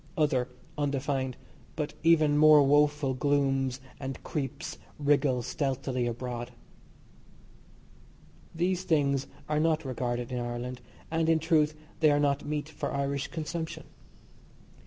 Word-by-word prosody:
Other, 135 -5 +2 0.3
undefined, 135 -2 -1 0.4
but 150 -1 -3
even 155 -3 +4
more 150 -1 +7
woeful 145 0 +3
glooms 135 -1 +1 0.2
and 135 -1 -6
creeps, 135 -5 -4 0.2
wriggle 140 -4 +2
stealthily 130 -2 -1
abroad. 120 0 -4 2.0
These 180 +2 0
things 140 -6 +1 0.2
are 150 0 +1
not 160 -1 +1
regarded 125 -1 -2
in 125 - -2
Ireland, 120 +1 -4 0.3
and, 165 0 +1
in 165 - +5
truth, 155 -2 +2 0.2
they 155 - +5
are 145 0 +3
not 145 -1 +1
meat 150 0 -3
for 160 - -4
Irish 140 -1 -1
consumption. 160 0 -5
145 Hz, 115 wpm, -29 LUFS, 130-155 Hz, 2.0 s, more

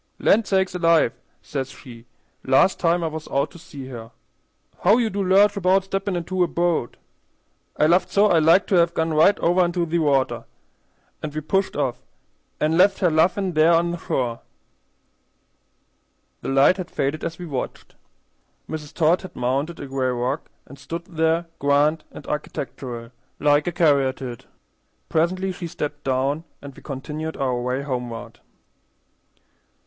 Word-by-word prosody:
'Land 215 0 +3
sakes 190 -2 +1
alive!' 165 -7 +3 0.3
says 135 -2 -4
she, 120 -3 -13 0.4
last 135 +8 +3
time 170 0 +2
I - - 0
was 155 0 -6
out 140 0 -1
to 175 - -13
see 140 -5 -10
her. 115 -3 -8 0.7
'How 205 +5 +4
you 230 -3 +1
do 200 - -2
lurch 200 +2 +4
about 190 0 +3
steppin' 195 0 -2
into 180 +2 -2
a - - +1
bo't?' 170 -7 -1 0.8
I - - +4
laughed 175 +3 +3
so 205 +1 +4
I 175 -6 +4
liked 165 +5 +5
to 195 - +3
have 170 0 +3
gone 160 0 0
right 160 +7 +5
over 175 +2 +3
into 175 0 0
the 170 +1 0
water; 140 -4 +1 0.8
an' 155 - -3
we 155 +1 -4
pushed 195 +6 0
off, 135 -4 -1 0.6
an' 160 +3 +1
left 195 +1 +5
her 180 -4 +2
laughin' 180 +4 +2
there 160 +2 +5
on 170 +1 +2
the 175 - -5
shore." 120 -6 -2 2.0
The - - -4
light 135 +7 +4
had 185 -3 -5
faded 140 +3 -2
as 165 0 -4
we 180 - -7
watched. 140 -6 -5 0.7
Mrs. 150 -2 -7
Todd 165 +2 +3
had 185 - -10
mounted 135 +7 -1
a - - -6
gray 135 -1 -1
rock, 125 0 -2 0.2
and 140 +1 -14
stood 170 +4 -6
there 165 -1 0
grand 145 +2 +2
and - - -11
architectural, 125 -5 -5 0.3
like 145 +1 +2
a - - +1
caryatide. 135 -7 +1 0.6
Presently 185 +4 0
she 180 -1 -6
stepped 150 -3 -5
down, 135 +4 0 0.2
and 140 -2 -11
we - - -14
continued 150 +3 -5
our 130 -3 -1
way 125 +2 -2
homeward. 120 -4 -5
160 Hz, 160 wpm, -23 LUFS, 135-175 Hz, 2.0 s, liked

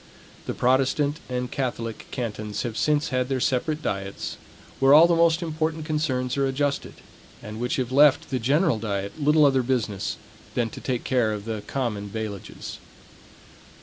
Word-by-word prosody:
The - - -2
Protestant 135 +4 +2
and 125 -1 -3
Catholic 115 -4 -3
cantons 105 -4 -4
have 120 -3 -4
since 150 +2 +1
had 125 -1 0
their 135 -1 0
separate 150 +5 0
diets, 100 0 -3 0.4
where 135 +1 +7
all 160 +2 +9
the 170 0 +3
most 170 +1 +3
important 160 -1 -2
concerns 130 -5 -1
are 135 -1 +2
adjusted, 140 +1 -1 0.5
and 105 +1 -7
which 125 +1 -1
have 130 -2 -2
left 140 +1 +5
the 130 - 0
general 140 +2 +2
diet 100 +4 -4
little 150 +1 +5
other 135 -2 +4
business 120 -6 -1 0.4
than 115 -2 0
to - - -9
take 125 -3 -2
care 125 -4 +2
of 105 -1 -5
the 110 -2 -3
common 105 -7 -2
bailages. 105 -2 -6
130 Hz, 160 wpm, -25 LUFS, 115-145 Hz, 0.5 s, all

